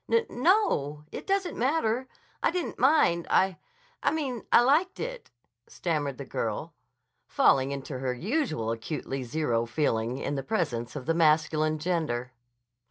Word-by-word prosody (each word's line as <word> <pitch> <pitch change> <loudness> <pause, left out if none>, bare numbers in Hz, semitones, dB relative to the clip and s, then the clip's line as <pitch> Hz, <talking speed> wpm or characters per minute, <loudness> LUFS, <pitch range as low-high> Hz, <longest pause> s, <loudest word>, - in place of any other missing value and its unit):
"N 460 0 +4
no. 245 - +2
It - - -7
doesn't 390 -2 0
matter. 255 -2 0 0.3
I - - +3
didn't 360 -1 -3
mind. 255 - +4
I—I 475 - -1
mean, 270 -7 -3
I - - +8
liked 305 +9 +2
it," - - -5 0.4
stammered 145 -6 -2
the - - -6
girl, - - -3 0.5
falling 135 0 +3
into 135 -1 -5
her 130 -1 -1
usual 175 - -1
acutely 135 +3 -4
zero 120 -3 -1
feeling 120 -2 0
in 140 - -3
the 140 - -2
presence 135 - -2
of 135 -4 -5
the 165 - +2
masculine 155 -1 +3
gender. 150 -7 -2
160 Hz, 140 wpm, -28 LUFS, -, 0.5 s, I